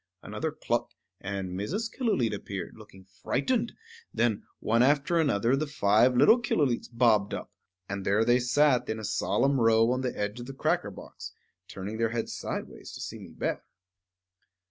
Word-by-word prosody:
Another - - -3
cluck, - - -2 0.2
and 95 -1 -4
Mrs. 150 - -2
Killooleet 175 - +1
appeared, 100 -3 -6
looking 95 -3 -15
frightened; 225 - -1 0.4
then, 115 -4 +1 0.2
one 115 +2 +2
after 145 +6 +3
another, 125 -5 +2
the 150 +2 -1
five 120 -2 +3
little 230 - +6
Killooleets 145 - 0
bobbed 115 -4 +3
up; - - -7 0.4
and 100 0 -4
there 105 +4 +2
they 120 +1 +4
sat 125 0 +2
in 110 - -1
a 110 - -6
solemn 125 +6 +1
row 115 +1 +4
on 130 +1 0
the 125 -1 -3
edge 105 +3 -3
of 120 - -7
the 135 - -8
cracker 155 -5 0
box, 95 - -10 0.3
turning 100 +3 -6
their 115 0 +2
heads 115 0 -3
sidewise - - -6
to - - -8
see - - -6
me - - -11
better. - - -3
120 Hz, 165 wpm, -28 LUFS, 105-135 Hz, 0.4 s, little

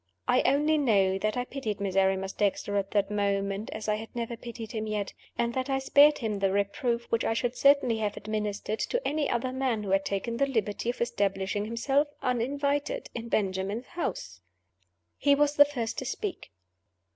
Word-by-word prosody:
I - - +4
only 300 +2 +2
know 195 -8 +3
that 215 +3 -1
I 245 - -1
pitied 235 -7 -4
Miserrimus 195 0 +1
Dexter 205 0 0
at 200 -1 0
that 205 -1 +1
moment 200 0 -1
as 215 - -6
I 210 0 +1
had 225 +1 -8
never 235 0 -3
pitied 230 -1 -8
him 220 -2 -3
yet; 210 -2 -2 0.2
and 235 0 0
that 260 +2 -2
I 270 - +2
spared 285 +2 +5
him 215 -4 -2
the 195 -1 +2
reproof 235 +5 0
which 230 - +2
I 225 - 0
should 245 +1 -1
certainly 275 -5 +4
have 210 -1 -2
administered 210 0 -3
to - - -1
any 300 0 0
other 245 +2 -1
man 260 -5 0
who 195 - -3
had 195 0 +3
taken 200 +4 -2
the 275 - +2
liberty 220 -3 -1
of 245 - -3
establishing 205 -3 0
himself, 270 +6 +1 0.2
uninvited, 280 - -1
in 235 -1 -6
Benjamin's 195 +3 -1
house. 95 - -4 0.8
He 285 0 +4
was 290 0 +2
the 290 - +8
first 245 -6 -3
to - - -5
speak. 415 -4 -4
225 Hz, 185 wpm, -28 LUFS, 200-270 Hz, 0.8 s, the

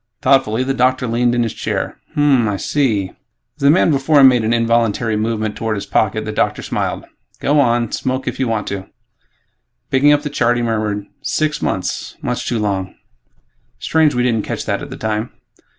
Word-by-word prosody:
Thoughtfully, 130 -3 +3
the 135 +1 -1
doctor 130 0 +1
leaned 120 +1 +1
back - - 0
in 120 - +2
his 115 - -3
chair, - - -3 0.2
"Hm 145 - +1
m 140 -4 +4
m... 110 - 0
I 100 - -2
see." 110 -8 0 0.5
As 150 - -21
the 140 - +5
man 165 +1 +4
before 145 +1 +3
him 135 -1 +9
made 125 -3 +1
an 110 - 0
involuntary 115 -1 +1
movement 110 0 -2
toward 110 -2 -2
his 100 - -5
pocket, 110 +1 0
the 110 - -3
doctor 105 - -1
smiled, - - -3 0.3
"Go 145 +1 +2
on, 120 -3 +2
smoke 130 +1 -2
if - - -3
you 130 - +1
want 110 -3 -1
to." 95 -1 -5 1.0
Picking 140 +2 +4
up 145 0 +3
the 150 - -4
chart, 120 -3 +1
he 120 - -1
murmured, 110 -3 -1 0.2
"Six 155 -1 -1
months... 95 - -3
much 125 0 -3
too 120 - 0
long. 95 -3 -2 0.8
Strange 155 -3 +2
we 125 - +1
didn't 115 -3 +1
catch - - -4
that - - -1
at - - -7
the - - -8
time." 110 +1 -3
120 Hz, 205 wpm, -18 LUFS, 110-135 Hz, 1.0 s, him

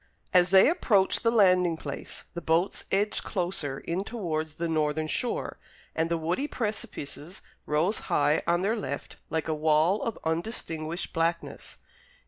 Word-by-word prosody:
As 180 -1 +5
they 190 0 +7
approached 215 - +2
the 230 - +3
landing 180 -6 +4
place, 145 -3 -7
the 170 - -5
boats 170 +4 +1
edged 205 +2 +1
closer 175 -8 -2
in 175 +6 -3
towards 160 -9 -3
the 170 +1 -2
northern 155 -1 0
shore, 235 +9 -2 0.4
and 160 +1 0
the 170 - +1
woody 175 - -1
precipices 205 - -5 0.2
rose 160 +8 +1
high 145 +2 +3
on 175 +1 +2
their 215 +4 +1
left 145 - -5
like 160 -2 -1
a 160 - 0
wall 155 +5 +3
of 230 - -3
undistinguished 165 -1 -3
blackness. 165 0 -2
170 Hz, 145 wpm, -28 LUFS, 155-195 Hz, 0.4 s, they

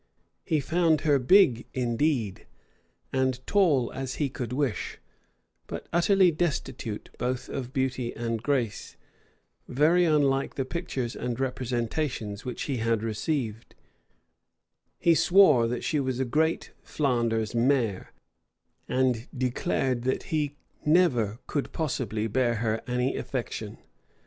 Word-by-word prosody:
He 160 -4 +1
found 160 +2 +2
her 145 -3 +3
big, 125 - +4
indeed, 120 -3 0 0.7
and 130 -1 +1
tall 155 - +2
as 130 -1 -4
he 145 -3 -1
could 125 -3 -5
wish; 130 -3 -2 0.7
but - - -6
utterly 185 +1 +4
destitute 150 -9 -3
both 125 +1 -2
of 130 -2 -5
beauty 130 -2 -1
and 115 -1 -2
grace; 120 -6 -2 0.7
very 160 +7 +3
unlike 140 -4 +2
the 135 - -1
pictures 135 -6 -3
and 120 0 -3
representations 125 -3 -2
which 125 - -4
he 135 -3 -2
had 115 -1 0
received: 115 0 -3 1.2
he 170 - +4
swore 150 -11 +5
she 155 - 0
was 130 -2 -1
a 130 - +1
great 160 +6 0
Flanders 115 -6 0
mare; 120 -5 +1 0.8
and 125 -2 +1
declared 125 0 0
that 130 +2 -1
he 145 -2 0 0.3
never 140 - +3
could 145 - -3
possibly 120 -8 -2
bear 120 +1 +1
her 110 0 -1
any 125 +1 0
affection. - - -4
130 Hz, 120 wpm, -27 LUFS, 120-150 Hz, 1.2 s, swore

